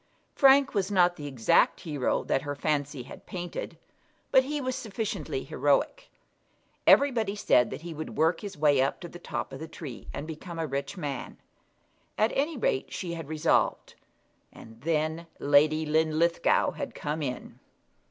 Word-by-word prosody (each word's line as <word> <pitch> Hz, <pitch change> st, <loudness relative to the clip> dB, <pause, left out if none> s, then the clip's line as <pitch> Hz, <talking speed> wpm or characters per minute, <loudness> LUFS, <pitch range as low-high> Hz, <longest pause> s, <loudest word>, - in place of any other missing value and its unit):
Frank 275 Hz, 0 st, +5 dB
was 195 Hz, -1 st, 0 dB
not 180 Hz, -3 st, +3 dB
the 145 Hz, -3 st, -7 dB
exact 125 Hz, -5 st, +2 dB
hero 145 Hz, -6 st, -1 dB
that 135 Hz, -, 0 dB
her 145 Hz, 0 st, -4 dB
fancy 145 Hz, -2 st, -1 dB
had 125 Hz, -, -13 dB
painted, 175 Hz, -1 st, -6 dB, 0.5 s
but 260 Hz, -1 st, +6 dB
he 295 Hz, +2 st, -2 dB
was 255 Hz, -2 st, -2 dB
sufficiently 220 Hz, -1 st, -4 dB
heroic. -, -, 0 dB, 0.8 s
Everybody 230 Hz, -8 st, +4 dB
said 125 Hz, -, +3 dB
that -, -, -7 dB
he 170 Hz, -1 st, -6 dB
would 155 Hz, +1 st, -7 dB
work 165 Hz, +1 st, +2 dB
his 200 Hz, -6 st, -7 dB
way 145 Hz, -3 st, +4 dB
up 135 Hz, -, 0 dB
to 175 Hz, -, -6 dB
the 175 Hz, -, -11 dB
top 120 Hz, -6 st, -5 dB
of 135 Hz, -, -7 dB
the 160 Hz, -, -6 dB
tree, 150 Hz, -6 st, -9 dB
and 145 Hz, -, -5 dB
become 165 Hz, +2 st, -8 dB
a 165 Hz, -, -1 dB
rich 140 Hz, +4 st, -4 dB
man. 145 Hz, -6 st, -5 dB, 0.8 s
At 215 Hz, +2 st, +3 dB
any 295 Hz, +2 st, 0 dB
rate 135 Hz, -, -1 dB
she 175 Hz, -2 st, -4 dB
had 165 Hz, -3 st, -6 dB
resolved; 155 Hz, +1 st, +1 dB, 0.6 s
and 115 Hz, 0 st, -14 dB
then 160 Hz, +2 st, -1 dB
Lady 155 Hz, +2 st, +3 dB
Linlithgow 160 Hz, +2 st, +2 dB
had -, -, -6 dB
come 150 Hz, +2 st, -3 dB
in! 125 Hz, -3 st, -5 dB
160 Hz, 160 wpm, -28 LUFS, 145-190 Hz, 0.8 s, but